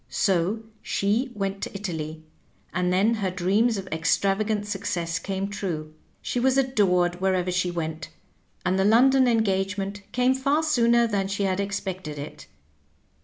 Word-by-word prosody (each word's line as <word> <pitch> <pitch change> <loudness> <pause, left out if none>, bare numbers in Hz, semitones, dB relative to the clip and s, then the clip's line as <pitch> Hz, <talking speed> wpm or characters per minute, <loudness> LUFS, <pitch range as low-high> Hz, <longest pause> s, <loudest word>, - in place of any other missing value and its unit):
So 195 +3 +1 0.2
she 220 +7 0
went 195 -1 -3
to - - -5
Italy; 160 -5 -5 0.5
and 180 +1 0
then 200 +5 +3
her 205 -4 -1
dreams 200 +5 +1
of 195 - -5
extravagant 200 +6 +1
success 175 -5 -2
came 195 +2 -3
true. 170 -6 -4 0.3
She 245 - -1
was 260 +2 +2
adored 180 -9 +2
wherever 185 -1 +1
she 180 0 0
went, 160 -2 -4 0.6
and 185 +1 +1
the - - +3
London 255 +5 +5
en 230 -2 +3
gagement 195 0 -2
came 250 +1 +3
far 275 +4 +1
sooner 235 -6 +3
than 200 -4 0
she 200 +1 -2
had 190 -1 0
expected 190 -6 -4
it. 145 +1 -8
195 Hz, 150 wpm, -25 LUFS, 180-220 Hz, 0.6 s, London